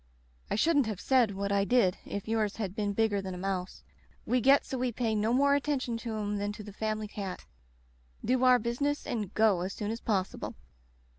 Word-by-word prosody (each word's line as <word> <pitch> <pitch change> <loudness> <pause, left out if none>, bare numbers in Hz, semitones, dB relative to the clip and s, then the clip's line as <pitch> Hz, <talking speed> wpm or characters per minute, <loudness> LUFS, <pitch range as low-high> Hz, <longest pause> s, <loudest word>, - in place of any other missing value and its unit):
I - - 0
shouldn't 290 +1 +3
have 210 -4 -4
said 240 -6 +3
what 200 +1 -2
I 200 0 +3
did 200 -4 +2
if 200 +1 -5
yours 215 -2 0
had 200 -5 -3
been 205 -2 -1
bigger 205 -1 +1
than 190 -1 -5
a - - -6
mouse. 185 0 -3 0.4
We 250 0 +1
get 275 +4 +5
so 260 - -4
we 250 -1 0
pay 230 -1 -1
no 215 +1 +1
more 280 +3 +4
attention 280 -4 0
to 230 -1 -4
'em 205 -1 -2
than 205 0 -2
to 210 - -9
the 205 -1 -10
family 215 0 -2
cat; 200 -3 -6 0.8
do 255 +2 +2
our 255 -1 +7
business 250 +6 -1
and 210 -5 -3
go 215 -5 +4
as 185 +2 -3
soon 210 -1 -3
as 230 - -5
possible. 195 -4 -2
215 Hz, 210 wpm, -30 LUFS, 200-245 Hz, 0.8 s, our